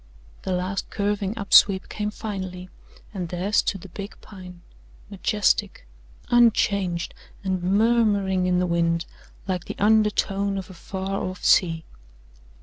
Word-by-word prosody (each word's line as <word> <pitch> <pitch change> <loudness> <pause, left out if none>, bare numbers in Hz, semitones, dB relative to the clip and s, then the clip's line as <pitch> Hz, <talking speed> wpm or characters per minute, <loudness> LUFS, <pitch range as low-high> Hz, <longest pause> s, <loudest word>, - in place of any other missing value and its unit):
The 190 - -4
last 185 +2 -2
curving 205 0 -2
up 200 -2 -5
sweep 190 -2 +6
came 210 0 -3
finally, 185 -4 -6 0.4
and 180 -4 -4
there 180 +4 -3
stood 195 -2 +2
the 195 - -11
big 200 +3 -8
Pine, 180 -3 -12 0.5
majestic, 205 - 0 0.5
unchanged 200 -7 +2 0.3
and 190 -2 -1
murmuring 200 -2 +2
in 180 0 +2
the 180 - +2
wind 170 -1 0 0.4
like 180 -2 -2
the - - -7
undertone 200 -2 +2
of 190 0 -6
a - - -10
far 190 +2 -4
off 185 0 -5
sea. 165 -3 +3
195 Hz, 135 wpm, -24 LUFS, 180-205 Hz, 0.5 s, sweep